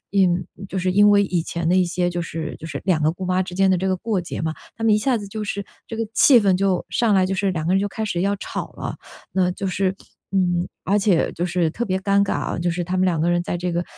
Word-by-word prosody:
因 185 -3 +2 0.2
就 190 - -3
是 185 0 0
因 205 +2 +6
为 200 0 +5
以 180 -3 0
前 170 0 -3
的 180 - +3
一 185 - +4
些 175 0 0
就 175 0 -2
是 160 -1 -5
就 160 - -8
是， 145 -3 -5
两 175 -5 +2
个 155 - +3
姑 185 +2 -7
妈 185 +1 +2
之 180 -1 -8
间 195 +1 +3
的 185 - +4
这 190 +2 -1
个 185 - +1
过 215 0 -1
节 170 - -6
嘛， 160 0 -1 0.2
她 225 - -4
们 220 -2 +5
一 - - +3
下 245 +2 +1
子 205 - -7
就 215 +2 -5
是 200 0 -3 0.2
这 225 - -6
个 225 0 -2
气 255 -5 +7
氛 195 -3 +3
就 190 -1 +1
上 230 -4 +2
来， 190 -1 +4
就 195 - -1
是 195 0 0
两 160 -4 -3
个 175 - +2
人 195 - +3
就 205 - -1
开 220 +2 -4
始 175 -5 -2
要 200 +2 +1
吵 - - -6
了。 - - -5 0.4
那 185 -1 +2
就 195 - -4
是 190 0 0 0.4
嗯， 180 -2 +1 0.2
而 200 +3 +2
且 195 -4 +2
就 175 - -2
是 175 -2 0
特 235 +9 -3
别 190 -4 -1
尴 200 +1 +2
尬 - - -2
啊， - - -2
就 175 +1 0
是 175 +1 -2
她 180 +2 -2
们 185 - +2
两 175 -4 +1
个 175 +2 +2
在 175 0 -3
这 175 0 -2
个 175 +1 -1
185 Hz, 315 characters per minute, -22 LUFS, 175-200 Hz, 0.4 s, 气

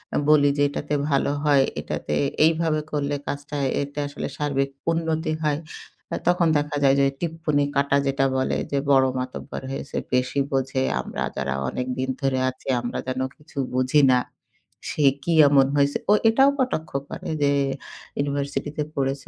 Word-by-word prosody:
আ - - +3
বলি 145 -2 +6
যে, 145 - +3
"এটাতে 145 +1 -3 0.2
ভালো 140 +1 +2
হয়, 145 -2 +5 0.2
এটাতে 75 - -3 0.3
এইভাবে 160 -1 +2
করলে 145 -1 -1
কাজটা 145 +1 -4 0.3
এটা 145 +1 -7
আসলে 145 - -5
সার্বিক 140 -2 0 0.2
উন্নতি 160 -1 -1
হয়।" 150 -1 +1 0.6
আ - - 0
তখন 175 -1 +4
দেখা 145 0 -2
যায় 135 0 +5
যে 140 - +5 0.2
টিপ্পনি 160 -3 0
কাটা 140 0 +3
যেটা 135 0 +1
বলে, 130 - 0
"যে 140 - +1
বড় 135 -1 +6
মাতব্বর 130 0 -6
হয়েছে, 135 - -5 0.2
বেশি 125 +2 +1
বোঝে। 135 -1 0 0.2
আমরা - - -4
যারা 70 0 -1 0.2
অনেকদিন 130 +1 -3
ধরে 135 -1 +1
আছি, 130 - -12
আমরা 120 - -4
যেন 130 0 -2 0.2
কিছু 150 0 -20 0.2
বুঝি 130 +3 +3
না। 125 - +4 0.7
সে 150 - 0 0.2
কি 170 - 0
এমন 140 -1 +5
হয়েছে?" 140 0 +3
ও - - +8 0.2
এটাও 270 +5 +5
কটাক্ষ 160 -12 -1 0.2
করে - - -6
যে 140 - +4 0.7
"ইউনিভার্সিটিতে 140 +1 -2
পড়েছে 135 0 -2
140 Hz, 160 wpm, -24 LUFS, 135-150 Hz, 0.7 s, ও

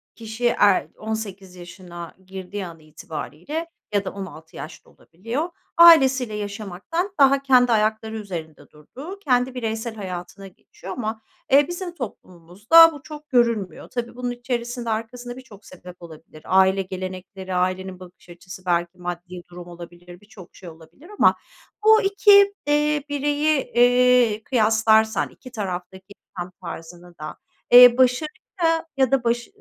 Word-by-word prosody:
kişi 225 +1 -6
er 200 -4 +3
18 200 -4 -6
yaşına 175 -1 -11
girdiği 190 +1 -7
an 165 -1 -12
itibariyle 160 - -7 0.2
ya 200 -1 0
da - - -2
16 185 -5 -10
yaş 155 - -10
da - - -22
olabiliyor, 230 - -6 0.3
ailesiyle 270 -9 +6
yaşamaktan 210 - -5
daha 275 0 +5
kendi 250 -3 +4
ayakları 220 0 0
üzerinde 170 -7 -8
durduğu, 275 - -11
kendi 255 -5 +1
bireysel 225 -1 -4
hayatına 190 0 -8
geçiyor 190 +1 -11
ama, 220 -2 -5 0.3
eee, 285 +1 +5
bizim 350 0 -6
toplumumuzda 210 - +3
bu 285 - -12
çok 300 -1 -11
görülmüyor. 230 - 0
Tabii 240 -1 -5
bunun 245 0 -3
içerisinde, 240 -1 -4
arkasında 245 +3 -5
birçok 220 -6 -15
sebep 180 -1 -13
olabilir, 160 -2 -14
aile 190 +1 +3
gelenekleri, 185 0 -7
ailenin 185 +1 -2
bakış 180 0 -16
açısı, 180 +2 -12
belki 175 0 -1
maddi 175 0 -7
durum 175 0 -11
olabilir, 175 +1 -12
birçok 205 -4 -16
şey 180 -3 -11
olabilir 165 - -17
ama - - +5 0.5
bu 440 0 +7
2 400 0 +5
eee, 295 0 +1
bireyi, 290 0 0
eee, 245 -2 +3
kıyaslarsan, 220 -2 +2
2 255 - -15
taraftaki 190 -1 -6 0.2
tam 175 +1 -5
tarzını 175 0 -10
da, 155 0 -8 0.3
eee, 245 0 +9
başarı 255 +4 +2 0.7
ya 265 -2 +2
da 265 -3 +2
baş 235 0 -1
215 Hz, 135 wpm, -22 LUFS, 180-250 Hz, 0.7 s, eee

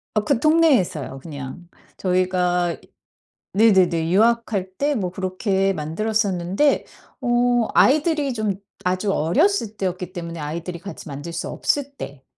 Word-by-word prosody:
어 215 - +1
그 225 - +2
동네에서요 260 - +2
그냥. 145 +4 -8 0.3
저희가 180 -2 +1 0.8
네네네 185 -6 +4
유학할 220 -3 +2
때 290 +1 +1
뭐 190 -8 -2
그렇게 190 +1 0
만들었었는데 195 - 0 0.4
어 240 -1 +2
아이들이 295 0 +3
좀 215 -4 -1 0.3
아주 185 +2 0
어렸을 220 - +1
때였기 185 -1 -3
때문에 170 -2 -6
아이들이 165 +3 -5
같이 195 -1 -9
만들 145 +4 -6
수 165 - -4
없을 280 -1 -1
때. 140 -1 -8
190 Hz, 280 characters per minute, -22 LUFS, 170-230 Hz, 0.8 s, 네네네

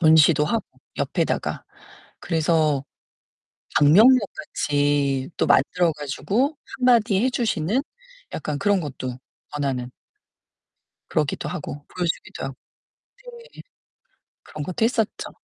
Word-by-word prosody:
전시도 160 -2 +6
하고 225 +8 -1 0.3
옆에다가 - - -1 0.6
그래서 155 -4 +1 1.0
방명록 215 - +7 0.2
같이 145 -1 0
또 - - +2
만들어 170 +5 +3
가지고 195 - -1 0.2
1 255 - -7
마디 225 -5 +4
해 260 - +3
주시는 225 - 0 0.5
약간 145 -1 -3
그런 205 -3 +2
것도 130 -4 -5 0.3
권하는 135 -4 -2 1.2
그러기도 150 -3 -1
하고 145 -4 -6
보여 180 -1 -4
주기도 165 - -4
하고 135 -1 -6 0.7
네. 475 -1 -12 0.9
그런 150 - -7
것도 185 +7 -2
했었죠. 225 -3 -1
160 Hz, 235 characters per minute, -23 LUFS, 145-215 Hz, 1.2 s, 방명록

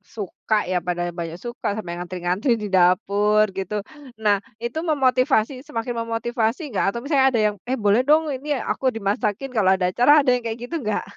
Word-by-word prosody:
suka 215 +1 -3 0.2
ya, 180 - +2
pada 175 0 -1 0.2
banyak 165 0 -5
suka 240 0 -5
sampai 170 -4 -6
ngantri-ngantri 180 +7 -2
di - - -2
dapur 200 +4 +3
gitu. 195 +2 -3 0.5
Nah 205 -1 +4 0.3
itu 240 +7 -3
memotivasi 260 -3 +2
semakin 235 +1 -4
memotivasi 230 +3 -1
enggak 200 - 0
atau - - -2
misalnya 280 -2 +3
ada 230 - +1
yang, 210 - -2
"Eh 265 - 0
boleh 205 +5 +5
dong 310 +1 +4
ini 290 +2 -2
aku 265 - -3
dimasakin 215 +4 -2
kalau 190 -3 +4
ada 180 - +2
acara." 245 +4 +5
Ada 260 - +1
yang 245 - -4
kayak 225 +1 -3
gitu 250 - -5
enggak? 210 0 -2
225 Hz, 185 wpm, -22 LUFS, 200-255 Hz, 0.5 s, boleh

